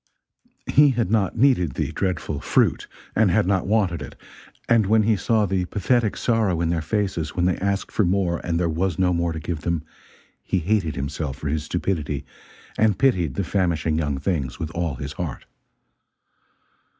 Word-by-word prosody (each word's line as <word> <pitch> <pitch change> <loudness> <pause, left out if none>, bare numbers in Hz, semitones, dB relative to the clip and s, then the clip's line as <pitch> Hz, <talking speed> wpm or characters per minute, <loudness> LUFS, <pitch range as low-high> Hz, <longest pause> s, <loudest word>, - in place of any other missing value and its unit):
He 145 0 +5
had 115 -6 0
not 110 -1 +1
needed 110 - +3
the - - -2
dreadful 95 -2 -2
"fruit," - - +1 0.3
and - - +4
had - - +3
not 95 -1 +1
wanted 100 -5 +1
it; - - -8 0.5
and 115 -4 +4
when 110 +1 +4
he 110 +1 +3
saw 110 +2 +1
the 95 -1 0
pathetic 110 +4 0
sorrow 110 -8 +1
in 85 -1 0
their 85 -2 0
faces 85 -3 -2
when 90 - +1
they 90 - +2
asked 100 +1 -2
for 110 - +2
more 90 -2 +1
and 85 -1 -1
there 90 - +1
was 85 +1 -1
no 90 -1 +2
more 85 0 0
to 80 - -4
give 80 0 -4
them, 85 -1 -1 0.6
he - - -1
hated 90 -2 0
himself 70 +1 -4
for 75 - -4
his 75 +1 -2
stupidity 75 -5 -2 0.5
and 110 -3 +3
pitied 90 - +2
the 100 - -1
famishing 85 -4 0
young 75 -3 -1
things 70 -4 -2
with 80 0 -4
all 85 -4 -2
his 70 +3 -6
heart. 80 -7 -5
90 Hz, 180 wpm, -23 LUFS, 80-100 Hz, 0.6 s, He